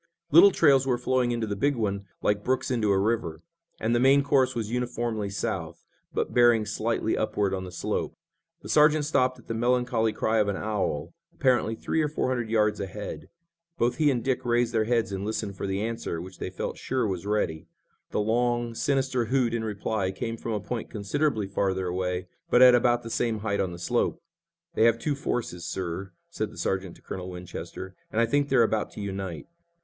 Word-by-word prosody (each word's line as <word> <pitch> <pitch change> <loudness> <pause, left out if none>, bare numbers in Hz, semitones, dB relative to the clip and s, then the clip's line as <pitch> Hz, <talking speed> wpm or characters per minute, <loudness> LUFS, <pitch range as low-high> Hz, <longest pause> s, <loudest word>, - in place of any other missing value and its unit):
Little 175 +6 +9
trails 140 -7 +4
were 125 -2 +2
flowing 125 0 +1
into 115 -1 -1
the 105 -1 -3
big 140 +8 +1
one 100 -3 -2 0.2
like 105 0 +1
brooks 130 +1 0
into 115 -4 +1
a 100 - +4
river, 100 -5 -1 0.4
and 115 +2 0
the 120 - +3
main 135 +2 +5
course 135 -3 +2
was 110 -2 -3
uniformly 120 -4 -2
south, 85 -4 -4 0.3
but - - -2
bearing 120 -3 +5
slightly 110 +1 -1
upward 105 -2 0
on 95 -1 -3
the 90 - -8
slope. 90 - -3 0.5
The - - -9
sergeant 150 0 +5
stopped 130 -4 +1
at 120 - -17
the - - -2
melancholy 120 -1 +1
cry 110 +1 +1
of 105 - +2
an 100 - 0
owl, 100 -9 -2 0.2
apparently 125 -4 +2
three 160 - -1
or 150 - +1
four 145 - -1
hundred 120 -3 -1
yards 105 -2 +2
ahead. 100 +1 -6 0.5
Both 120 -3 +1
he 155 -2 +4
and 125 -4 0
Dick 130 -2 0
raised 120 0 +1
their 110 -1 +2
heads 115 -2 +1
and 95 0 -3
listened 105 -1 -3
for 100 - -4
the 95 +2 -1
answer, 115 -7 -3
which 95 +1 -9
they - - -3
felt - - -5
sure 130 -2 -1
was 95 -1 -3
ready. 80 -7 -1 0.4
The - - 0
long, 120 +2 +1
sinister 130 -1 0
hoot 125 -1 +1
in 115 -1 -1
reply 105 -2 -2
came 115 +4 -4
from 115 0 -4
a 105 - -1
point 115 +3 -5
considerably 110 +2 -1
farther 95 -1 -1
away, 90 0 -2 0.2
but 125 - +6
at 125 -1 +9
about 120 0 +3
the 115 - -7
same 115 -3 0
height 100 -2 -1
on 95 - 0
the 85 - -7
slope. 85 - 0 0.5
"They 110 - +3
have 115 0 +4
two 145 +5 -1
forces, 120 -10 -3
sir," 90 +2 -4 0.2
said - - -3
the - - -14
sergeant 95 -2 -2
to - - -21
Colonel 90 -1 -6
Winchester, 90 +1 -7 0.2
"and 110 - 0
I 115 - +5
think 145 +4 +1
they're 130 -3 +5
about 110 -1 0
to - - -9
unite." 95 -4 -5
110 Hz, 205 wpm, -27 LUFS, 100-125 Hz, 0.5 s, Little